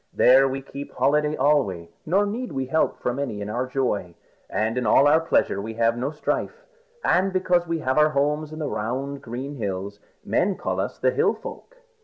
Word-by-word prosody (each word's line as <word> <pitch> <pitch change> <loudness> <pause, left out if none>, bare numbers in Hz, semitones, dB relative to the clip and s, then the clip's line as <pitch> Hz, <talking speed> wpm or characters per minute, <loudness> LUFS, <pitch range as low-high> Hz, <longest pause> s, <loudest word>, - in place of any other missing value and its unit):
There 135 +2 +6
we 135 0 -4
keep 140 +1 -8
holiday 150 +3 +2
alway, 125 - +1 0.2
nor 195 +5 +3
need 225 +2 -4
we 135 -1 -2
help 160 +5 +1
from 125 +2 -2
any 120 -7 -3
in 105 +1 -4
our 125 +3 -2
joy. 115 -10 -2 0.3
And 110 +2 -1
in 125 -3 -1
all 135 +6 +6
our 155 +2 +5
pleasure 165 -10 +1
we 110 +2 -6
have 115 0 +2
no 125 +3 -2
strife. 470 - -3 0.4
And 190 +2 +3
because 180 -2 +1
we 165 0 -1
have 130 +1 +1
our 150 0 +5
homes 150 +1 0
in 155 - -8
the 155 -2 -3
round 135 +6 -3
green 135 +3 -6
hills, 100 -1 -4 0.3
men 190 +1 +1
call - - -2
us - - -3
the - - +2
Hill 435 -1 +2
Folk." - - -10
135 Hz, 200 wpm, -24 LUFS, 120-155 Hz, 0.4 s, There